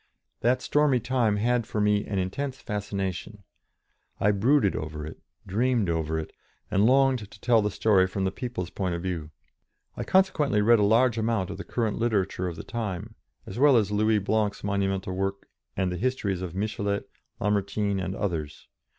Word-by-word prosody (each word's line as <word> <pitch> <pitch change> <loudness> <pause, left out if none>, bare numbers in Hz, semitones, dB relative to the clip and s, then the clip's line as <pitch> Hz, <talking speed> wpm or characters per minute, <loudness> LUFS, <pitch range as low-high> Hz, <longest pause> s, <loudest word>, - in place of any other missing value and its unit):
That 125 +2 +1
stormy 150 -4 +3
time 120 -3 +1
had 120 +1 +1
for 110 - -3
me 105 0 +2
an 100 - -2
intense 130 +9 -3
fascination. 100 -1 -4 0.8
I 105 - +4
brooded 110 +1 +3
over 75 0 -5
it, 80 - -9 0.3
dreamed 110 -1 +1
over 80 -1 -1
it, 80 - -5 0.4
and 100 +3 +4
longed 130 -5 +3
to 105 - -15
tell 115 0 +4
the 105 - 0
story 95 -2 +3
from 95 +1 -3
the 95 - 0
people's 115 -9 -5
point 90 -3 -2
of 85 - -5
view. 85 -5 -3 0.7
I - - -3
consequently 155 - +2
read 115 +2 +5
a - - +3
large 115 +3 +3
amount 110 -4 0
of 100 - -6
the - - -4
current 110 -4 -2
literature 100 -5 0
of 85 - -4
the - - -7
time, 110 -2 -4 0.3
as 95 - -7
well 140 -2 +6
as 105 -3 +1
Louis 110 +1 +3
Blanc's 105 0 0
monumental 95 -2 -1
work 95 +1 -3 0.3
and 95 -1 0
the 90 - -3
histories 105 -5 -1
of 90 -2 -5
Michelet, 100 0 -1 0.4
Lamartine, 100 0 0
and 95 +1 -3
others. 80 -7 -4
105 Hz, 175 wpm, -27 LUFS, 95-115 Hz, 0.8 s, well